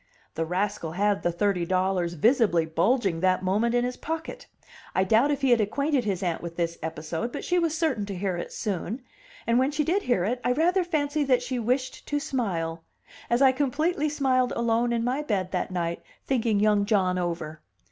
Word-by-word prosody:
The 165 - -2
rascal 180 -2 -2
had 200 +2 +1
the 175 - +1
thirty 180 +1 0
dollars 185 -1 0
visibly 210 - +3
bulging 175 +3 +1
that 185 +1 +2
moment 215 +6 +1
in 245 0 +2
his 250 0 -4
pocket. 325 +1 -5 0.5
I 190 - +3
doubt 225 +8 +3
if 285 -1 -1
he 270 -2 +3
had 235 -2 +5
acquainted 280 +4 0
his 195 -3 -1
aunt 170 -3 -1
with 170 -1 -7
this 170 -1 -2
episode, 160 +7 -4
but - - -5
she 355 0 +2
was 325 -2 0
certain 265 -11 0
to 200 - -5
hear 185 0 -2
it 175 - -5
soon; 215 +4 -3 0.4
and 235 +1 +3
when 260 +1 +2
she 300 +1 0
did 360 +7 +1
hear 245 - +1
it, 245 +4 -1
I 245 - +2
rather 350 +6 +2
fancy 305 -3 0
that 250 -2 +2
she 250 0 -3
wished 255 +3 -2
to 290 - 0
smile 170 - -2 0.5
as 240 +3 +3
I 265 - +7
completely 295 +4 0
smiled 260 -4 +1
alone 235 +1 +1
in 230 -1 0
my 255 +4 0
bed 195 -10 -2
that 180 - -1
night 170 -2 -2 0.2
thinking 230 -5 +1
young 210 -1 +3
John 185 -4 +2
over. 165 -3 -4
225 Hz, 200 wpm, -26 LUFS, 185-265 Hz, 0.5 s, I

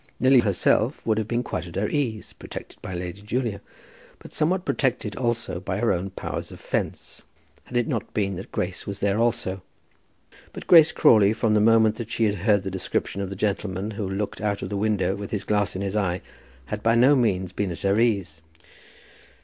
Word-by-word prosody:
Lily 130 0 +6
herself 110 +4 +1
would 110 -1 +2
have 110 - -3
been 120 +1 -1
quite 85 -7 -4
at 85 - -11
her 105 +2 0
ease, 120 -7 -2
protected - - -10
by 95 - -6
Lady 90 +2 -5
Julia, 110 -1 -2 0.6
and - - -12
somewhat 180 +4 +1
protected 120 -6 -1
also 120 -7 -1
by 95 - -3
her 115 +2 +2
own 90 +2 -2
powers 95 - -5
of - - -11
fence, - - -4 0.4
had 125 - -3
it 120 - +1
not - - -3
been 100 -2 -1
that 95 - -9
Grace 90 0 -3
was 100 -1 -5
there 100 +1 +1
also. 100 -5 0 0.9
But - - -8
Grace 160 -3 +7
Crawley, 105 -2 +5
from 110 -1 +1
the 105 - +4
moment 110 0 +4
that 115 -2 -6
she 115 -1 -1
had 105 -2 +3
heard 100 -3 +4
the 95 - -4
description 95 +1 -2
of 100 - -3
the 100 - -6
gentleman 100 0 -2
who 100 -2 -4
looked 100 +2 -3
out 100 -1 -1
of 95 - -4
the 100 - -3
window 100 -2 +1
with 100 0 -6
his 105 - -2
glass 105 -2 0
in 95 - -3
his 100 +1 -3
eye, 95 -4 0 0.4
had 75 - -5
by 115 +1 +3
no 130 +5 +6
means 95 -8 +1
been 100 0 -2
at 85 - -6
her 100 +2 +2
ease. 100 -9 0
105 Hz, 205 wpm, -24 LUFS, 95-115 Hz, 0.9 s, Grace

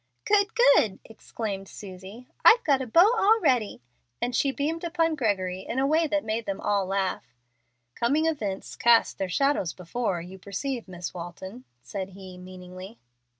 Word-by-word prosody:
"Good, 410 +1 +2
good!" 475 - +4
exclaimed 210 -3 -6
Susie. 195 +6 -11 0.2
"I've 470 +1 +7
got 275 -3 +2
a 260 - -4
beau 350 - +5
already;" 335 - +2 0.4
and 245 0 -2
she 275 - +2
beamed 310 +5 -3
upon 330 -1 +1
Gregory 195 -9 -1
in 230 +6 -6
a 265 - +2
way 315 +3 +2
that 300 0 0
made 220 +1 -3
them 195 -1 -3
all 200 -2 0
laugh. 190 -10 -2 0.6
"'Coming 285 - +1
events 210 -12 -3
cast 235 -1 +3
their 190 -1 -2
shadows 275 - +1
before,' 185 +1 -3
you 185 +2 -11
perceive, 235 +6 -4
Miss 180 -2 -7
Walton," 185 +6 -8 0.2
said 195 -2 -6
he, 190 -2 -10
meaningly. 185 +3 -11
220 Hz, 155 wpm, -26 LUFS, 190-290 Hz, 0.6 s, I've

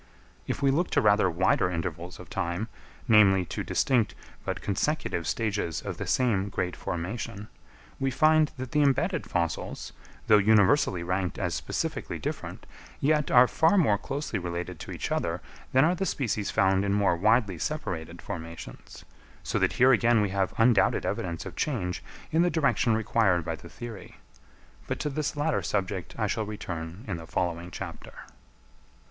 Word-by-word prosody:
If - - -3
we 135 - +5
look 170 +6 +1
to - - +8
rather 105 -3 +4
wider 90 +1 +2
intervals 85 +1 -4
of - - -10
time, 95 +4 -3 0.4
namely, 100 -5 +6
to - - -4
distinct 120 -6 +1 0.3
but - - -3
consecutive 100 - -1
stages 105 -7 -1
of - - -5
the - - -5
same 105 -6 +1
great 90 -2 -2
formation, 105 +4 -5 0.5
we 135 - +1
find 155 +3 +4
that 130 -1 -6
the 150 - +3
embedded 145 +5 +1
fossils, 85 -2 -2 0.3
though 105 -1 +6
universally 105 -2 +4
ranked 90 0 -1
as - - -1
specifically - - -3
different, - - -5 0.3
yet 150 0 +2
are 125 0 +7
far 160 +10 +3
more 110 - +3
closely 135 -7 -3
related 85 -1 -5
to - - -8
each - - -4
other - - -1 0.3
than 130 +3 +5
are 170 - +3
the 190 +1 -2
species 110 -6 -1
found 95 0 +3
in 100 -1 +1
more 100 -3 +3
widely 105 -1 +2
separated 85 - -4
formations; 80 -6 -8 0.4
so - - -1
that - - +2
here 130 +1 +5
again 120 -1 +4
we 105 -1 +1
have 95 -1 0
undoubted 115 -2 +3
evidence 85 -2 -3
of - - -8
change 95 -12 -2 0.3
in 160 - +3
the 175 - +3
direction 125 -8 +2
required 105 -6 +2
by - - -2
the - - -10
theory; 115 -6 -9 0.7
but - - -2
to 150 - -2
this 150 +1 -2
latter 150 +1 +1
subject 95 -2 -2
I 110 - 0
shall 105 +1 -1
return 90 -2 -6
in 95 -5 -2
the 80 0 -10
following 85 0 -2
chapter. - - -8
105 Hz, 165 wpm, -28 LUFS, 90-130 Hz, 0.7 s, to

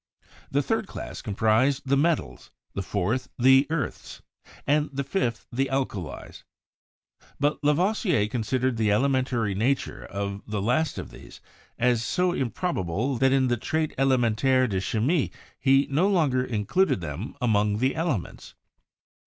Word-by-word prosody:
The - - +1
third - - -1
class - - -7
comprised 110 +6 +1
the 135 +1 +2
metals, 160 +3 0 0.2
the 100 - -3
fourth 100 +6 -2
the 130 +2 +5
earths, 155 -6 -4 0.4
and 150 +1 +2
the 140 0 -3
fifth 120 - -2
the 135 +2 0
alkalies; 120 - -4 1.0
but 145 +1 0
Lavoisier 170 - +2
considered 125 +2 -1
the 110 -1 +1
ele 105 +7 +3
mentary 125 -6 0
nature 125 +7 -1
of 100 0 -4
the 105 -1 -2
last 125 +10 0
of - - -6
these - - -13 0.4
as 120 -1 +2
so 180 +10 +1
improbable 125 - -2
that 135 +2 +3
in 135 -1 +3
the 120 -1 +1
"Traite 155 +7 -1
Elementaire 130 0 +2
de 95 -4 -1
Chimie" 125 - 0 0.3
he 135 +1 +4
no 170 +8 +3
longer 145 -10 +2
in 110 -5 -3
cluded 185 - +2
them 80 - -6
among 105 -4 +2
the 130 +4 +1
elements. 155 - -3
130 Hz, 145 wpm, -26 LUFS, 110-140 Hz, 1.0 s, the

